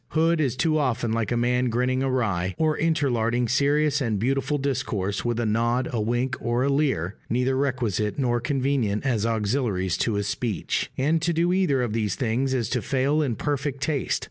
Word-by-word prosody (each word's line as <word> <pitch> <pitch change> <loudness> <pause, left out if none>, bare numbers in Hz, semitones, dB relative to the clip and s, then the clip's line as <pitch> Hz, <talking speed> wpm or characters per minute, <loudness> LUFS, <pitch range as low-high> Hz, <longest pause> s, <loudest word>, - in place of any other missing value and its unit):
Hood 165 0 +3
is 130 -4 0
too 155 +3 +1
often 120 -5 0
like 115 -1 -1
a 120 - +1
man 125 +1 +1
grinning 125 +2 0
awry, 105 -9 0
or 155 -1 +2
interlarding 125 -7 +1
serious 145 +4 +2
and 115 -5 0
beautiful 135 +6 0
discourse 105 -8 -2
with 120 -1 -1
a 120 - 0
nod, 120 +3 +1
a 115 - -1
wink, 120 +4 0
or 120 +1 0
a 140 - +1
leer, 135 - 0
neither 125 +2 +1
requisite 120 -7 -1
nor 120 -3 +1
convenient 130 -4 0
as 115 -4 +1
auxiliaries 105 -5 0
to 115 - 0
his 100 0 -1
speech: 105 0 -2
and 155 +5 +1
to 170 +1 +1
do 170 +2 +2
either 160 -9 +2
of 115 -3 -2
these 105 -4 -1
things 130 +1 0
is 120 -4 0
to 125 -2 0
fail 140 +5 +1
in 130 -6 -1
perfect 140 0 -2
taste. 145 -3 0
125 Hz, 190 wpm, -25 LUFS, 115-140 Hz, -, Hood